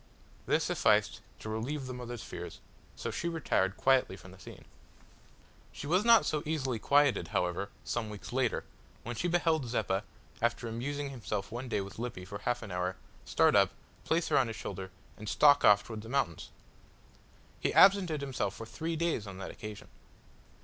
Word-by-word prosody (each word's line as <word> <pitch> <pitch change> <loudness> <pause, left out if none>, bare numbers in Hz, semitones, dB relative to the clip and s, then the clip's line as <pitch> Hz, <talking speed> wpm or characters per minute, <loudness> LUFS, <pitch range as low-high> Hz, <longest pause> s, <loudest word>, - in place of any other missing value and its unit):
This - - +3
sufficed - - +2 0.2
to - - -9
relieve 130 +6 -3
the 130 - -5
mother's 120 -3 -6
fears, - - -7 0.4
so - - -4
she 170 - -2
retired 115 - 0
quietly 130 -7 +3
from 95 0 -13
the 95 - -15
scene. - - -12 1.1
She - - -8
was 180 +7 +2
not 230 0 +7
so 150 - 0
easily 135 -7 -1
quieted, 145 +2 +3
however, 90 -1 -1
some 115 -3 -2
weeks 105 +3 -8
later, 130 -2 +1 0.4
when 120 +1 -5
she 175 - -1
beheld 165 -5 +2
Zeppa, 105 -4 0 0.4
after 120 +1 0
amusing 140 +5 -3
himself 105 -4 -4
one 120 +2 -5
day 105 - 0
with 100 +2 -8
Lippy 115 -6 -5
for 100 +1 -7
half 120 0 -1
an 105 - -7
hour, 90 +1 -1 0.3
start - - +4
up, - - +5 0.3
place 165 +1 +1
her - - +4
on 130 - +2
his 115 - -5
shoulder, 95 -3 -6 0.3
and 105 0 -6
stalk 145 -1 +6
off 105 0 +7
towards 110 -1 -7
the 110 - -10
mountains. 135 - -1 1.1
He - - 0
absented 190 -6 +6
himself 125 -8 -2
for 115 - -7
three 165 +8 -4
days 160 -10 -1
on 95 -2 -8
that 95 - -6
occasion. 105 -2 -9
120 Hz, 175 wpm, -31 LUFS, 105-145 Hz, 1.1 s, not